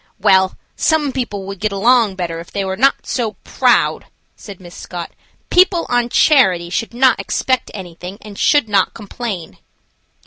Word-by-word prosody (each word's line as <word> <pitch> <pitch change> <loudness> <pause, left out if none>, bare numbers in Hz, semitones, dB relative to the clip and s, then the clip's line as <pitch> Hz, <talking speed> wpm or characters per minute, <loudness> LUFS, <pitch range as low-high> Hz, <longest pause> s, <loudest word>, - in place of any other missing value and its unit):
"Well, 190 0 +3 0.2
some 305 -3 +1
people 225 -7 -4
would 195 -1 -7
get 215 0 -1
along 220 0 +3
better 170 -3 -4
if 170 - -11
they 200 -1 -2
were 190 0 -3
not 270 +7 +2
so 230 -4 -2
proud," - - +1 0.3
said 200 -4 -11
Miss 175 -2 -13
Scott. 175 -2 -7 0.4
"People 360 -2 +4
on 245 -1 +1
charity 185 - +3
should 230 +5 -3
not 260 +1 +3
expect 255 -2 -1
anything 180 0 -9
and 210 -1 -12
should 290 +2 +2
not 200 -3 +1
complain." 205 -5 -6
205 Hz, 160 wpm, -17 LUFS, 190-250 Hz, 0.4 s, People